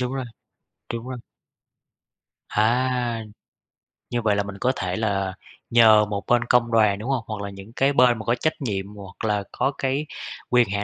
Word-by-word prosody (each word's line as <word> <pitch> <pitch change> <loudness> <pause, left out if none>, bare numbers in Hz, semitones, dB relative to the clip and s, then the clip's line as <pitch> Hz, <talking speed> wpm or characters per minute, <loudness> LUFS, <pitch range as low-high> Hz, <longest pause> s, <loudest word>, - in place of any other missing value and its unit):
Đúng 125 +1 -1
rồi, 135 -1 -3 0.7
đúng 115 +2 -5
rồi. 130 -1 -5 1.3
À! 120 +1 +1 0.9
Như 120 -1 -1
vậy 105 -2 +2
là 100 - +1
mình 100 0 -8
có 130 - +2
thể 90 -1 -2
là 100 -4 -1 0.4
nhờ 110 -2 +7
một 100 -1 -4
bên 120 -1 +3
công 120 -1 +3
đoàn, 105 -3 +3
đúng 115 +6 -5
hông? 130 -4 0
Hoặc 110 -3 -4
là 100 - -4
những 100 +3 -11
cái 135 +2 +2
bên 125 -3 +5
mà 110 - -7
có 120 - +2
trách 155 +6 0
nhiệm 100 -7 -2
hoặc 100 +1 -8
là 105 -2 +1
có 135 - 0
cái 135 +3 -1 0.4
quyền 125 -3 +4
hạn 100 0 -1
115 Hz, 190 wpm, -24 LUFS, 100-125 Hz, 1.3 s, nhờ